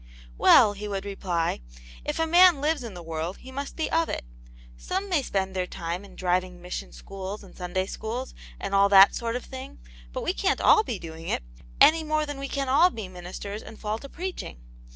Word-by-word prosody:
" - - -20
Well," 205 - +7
he 205 +1 -6
would 200 -1 -3
reply, 180 - -1 0.4
"if - - -3
a 325 - +2
man 345 -1 +6
lives 300 -1 0
in 225 -5 -7
the 175 - -8
world 165 +2 -4
he 260 - -12
must 275 +1 -5
be 320 - -1
of 330 0 +2
it. - - -3 0.5
Some 385 +2 -3
may 340 -6 +2
spend 190 -6 -2
their 180 -1 -1
time 170 +3 -4
in 200 - -14
driving 180 0 -1
mission 175 - -6
schools 195 - -7
and 195 - -15
Sunday 180 +1 -2
schools, 230 +6 -5 0.3
and 200 - -4
all 200 0 +5
that 195 0 +8
sort 230 0 -2
of 250 - -4
thing, 260 0 -9 0.3
but - - -4
we - - 0
cian't 390 0 0
all 435 - +6
be 235 - -3
doing 165 -1 -9
it, - - -1 0.4
any 320 +1 +7
more 310 0 0
than 290 -2 -6
we 275 - -4
can 275 0 -2
all 285 +8 +5
be 220 - -6
ministers 185 +3 -7
and 220 - -12
fall 215 +1 -3
to 275 - -10
preaching. 360 - -6
205 Hz, 215 wpm, -26 LUFS, 185-280 Hz, 0.5 s, that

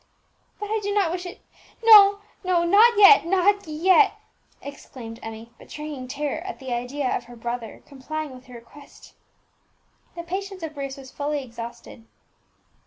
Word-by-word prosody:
"But 415 0 -6
I 440 - 0
do 405 0 -3
not 390 -5 +2
wish 355 +1 -5
it, 360 - -11 0.4
no, 410 -3 +8 0.2
no, 360 -2 +1
not 420 +6 +5
yet, 415 +1 +8
not 385 +2 +1
yet!" 365 +6 +3 0.5
exclaimed 245 -5 -10
Emmie, 225 +1 -9
betraying 295 -4 -8
terror 285 +2 -3
at 370 +1 -7
the 260 -2 -6
idea 250 +3 -2
of - - -5
her 240 0 -13
brother 235 -1 -6
complying 300 +2 -6
with 255 -1 -14
her 250 - -12
request. 235 +5 -16 1.0
The 340 - -6
patience 380 +1 -6
of 315 -1 -5
Bruce 275 -2 -6
was 265 -1 -12
fairly 290 0 -3
exhausted. 235 -1 -10
300 Hz, 155 wpm, -23 LUFS, 255-380 Hz, 1.0 s, no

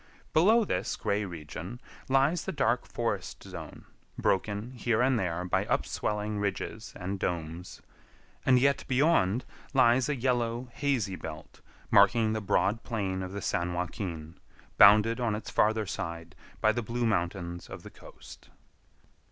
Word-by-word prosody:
Below 215 +8 +5
this - - -1
gray 105 +1 -1
region 85 +6 -7 0.3
lies 140 +6 +2
the - - -2
dark 125 -7 0
forest 105 -6 -3
zone, 85 -5 -9 0.3
broken 105 +4 0
here 120 -3 0
and 125 -1 +3
there 90 -2 -2
by 90 - 0
upswelling 105 0 -1
ridges 105 +2 -3
and 95 +2 -4
domes; 85 0 -4 0.6
and 130 -1 +5
yet 140 +2 +2
beyond 130 - +2 0.3
lies 125 0 +4
a 150 - +1
yellow, 120 -1 -1
hazy 125 -10 0
belt, 80 -3 -9 0.3
marking 110 +2 +5
the 110 - -2
broad 105 +2 +1
plain 95 -5 -2
of 95 0 -5
the 100 -1 -5
San 85 +1 -1
Joaquin, 85 -2 -5 0.4
bounded 105 +4 +7
on 115 -4 0
its 105 - -6
farther 110 0 +2
side 85 -2 -5 0.3
by 110 - +5
the 120 +2 -2
blue 120 +1 -2
mountains 85 -4 -2
of - - -9
the - - -10
coast. - - -14
105 Hz, 145 wpm, -29 LUFS, 90-120 Hz, 0.6 s, bounded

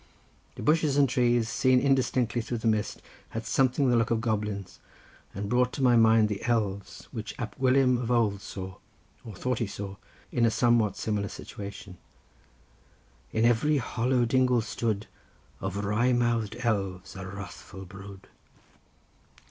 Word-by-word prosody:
The - - -7
bushes 150 -2 +2
and 140 -1 +5
trees, 120 -2 +2
seen 130 +2 +3
indistinctly 130 -3 +1
through 120 +1 -4
the 115 - -2
mist, 110 -1 0 0.3
had 115 0 -5
something 130 +3 +2
the 125 - +3
look 115 0 +2
of 115 - +1
goblins, 105 -4 -3 0.6
and 100 +1 -3
brought 125 +3 +2
to 135 - -2
my 125 -2 +5
mind 115 -1 +5
the 105 -2 -4
elves, 105 -5 -2
which 110 -4 -6
Ab 120 - -5
Gwilym 130 -1 +3
of 120 - -3
old 110 -5 +2
saw, 95 -2 -7 0.5
or 110 -4 -9
thought 125 +4 -2
he 115 - -1
saw, 100 0 -7 0.3
in 120 - +1
a 115 - +5
somewhat 115 -3 +2
similar 105 -2 -1
situation:— 100 -2 -9 1.3
"In 110 +1 +2
every 125 +6 +3
hollow 125 0 +1
dingle 125 0 +3
stood 110 -1 -2 0.5
Of 100 +2 -3
wry 115 +5 +2
mouth'd 120 -3 0
elves 95 -7 -2
a 95 -1 -6
wrathful 95 0 -9
brood." 95 +1 -11
115 Hz, 150 wpm, -28 LUFS, 100-125 Hz, 1.3 s, and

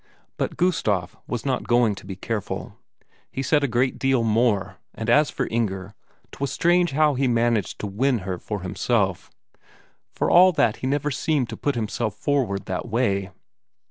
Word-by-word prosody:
But - - -3
Gustaf 105 - 0
was 120 +1 -4
not 130 -2 -1
going 120 -3 +3
to 95 - -11
be 95 - -5
careful; 105 +2 -4 0.6
he 135 - -3
said 145 +2 +2
a - - +2
great 125 +2 0
deal 135 -3 +2
more, 110 -3 +1 0.2
and 115 +1 -1
as 150 +4 +5
for - - -2
Inger, 100 -4 -2 0.4
'twas 140 -1 -3
strange 175 -1 +2
how 150 +1 +3
he 135 0 +1
managed 115 -4 +1
to - - -3
win 120 +6 +1
her 90 -2 -3
for 105 -3 -5
himself, 95 0 -1 0.8
for - - -1
all 185 +1 +7
that 115 -8 +2
he 130 - -4
never 145 +2 0
seemed 140 -2 0
to - - -5
put 145 -2 -1
himself 115 0 -2
forward 125 -10 -1
that 90 -1 -4
way. 100 -5 0
120 Hz, 175 wpm, -24 LUFS, 105-140 Hz, 0.8 s, all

